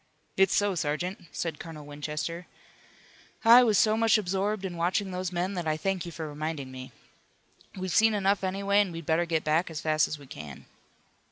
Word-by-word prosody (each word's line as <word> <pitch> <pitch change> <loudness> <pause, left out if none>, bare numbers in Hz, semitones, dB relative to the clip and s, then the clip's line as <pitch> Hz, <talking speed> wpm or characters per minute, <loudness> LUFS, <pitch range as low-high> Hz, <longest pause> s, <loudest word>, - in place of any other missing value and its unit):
"It's 190 -1 +3
so, 205 -1 +2
sergeant," 175 +4 -3
said 165 -3 -4
Colonel 155 -3 -9
Winchester. 150 +4 -5 1.0
"I 235 +2 +9
was 220 -4 +3
so 215 0 +4
much 225 0 +4
absorbed 195 +1 -1
in 180 -2 -4
watching 185 +3 0
those 180 0 -3
men 180 +2 -1
that 175 -4 -3
I 155 0 +1
thank 190 0 -2
you - - -6
for 160 0 -6
reminding 150 -2 -5
me. 130 0 -9 0.9
We've 185 -1 -3
seen 220 0 +4
enough 200 0 +1
anyway 200 +2 +2
and 195 -3 -1
we'd 165 -1 -7
better 165 +2 +2
get 160 -1 0
back 160 +4 +1
as 160 -2 -5
fast 155 -1 +2
as 155 - -5
we 145 - -14
can." 75 - -10
175 Hz, 190 wpm, -28 LUFS, 155-195 Hz, 1.0 s, I